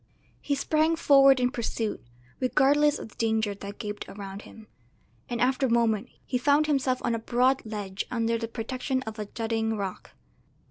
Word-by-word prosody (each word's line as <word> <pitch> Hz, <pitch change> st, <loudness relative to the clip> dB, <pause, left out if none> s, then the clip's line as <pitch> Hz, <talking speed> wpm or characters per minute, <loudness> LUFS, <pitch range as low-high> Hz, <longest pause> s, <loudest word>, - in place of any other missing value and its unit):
He 285 Hz, -, 0 dB
sprang 310 Hz, +3 st, +2 dB
forward 275 Hz, -4 st, +6 dB
in 250 Hz, 0 st, +1 dB
pursuit, 230 Hz, -3 st, -3 dB, 0.4 s
regardless 290 Hz, +3 st, +3 dB
of -, -, -8 dB
the -, -, -20 dB
danger 220 Hz, -2 st, +1 dB
that 200 Hz, 0 st, -9 dB
gaped 210 Hz, -1 st, -6 dB
around 195 Hz, 0 st, -8 dB
him; 220 Hz, 0 st, -14 dB, 0.6 s
and 240 Hz, -1 st, -3 dB
after 260 Hz, +2 st, +2 dB
a -, -, -2 dB
moment 230 Hz, 0 st, +2 dB, 0.2 s
he 250 Hz, -, -1 dB
found 285 Hz, +3 st, +3 dB
himself 270 Hz, -4 st, +1 dB
on 235 Hz, -, +1 dB
a 230 Hz, -, -1 dB
broad 250 Hz, +4 st, +2 dB
ledge 205 Hz, -3 st, -4 dB
under 230 Hz, -1 st, 0 dB
the 230 Hz, -, -3 dB
protection 255 Hz, +3 st, -3 dB
of 220 Hz, -1 st, -7 dB
a 210 Hz, -, -4 dB
jutting 225 Hz, 0 st, -2 dB
rock. 195 Hz, -2 st, -6 dB
235 Hz, 175 wpm, -27 LUFS, 220-265 Hz, 0.6 s, forward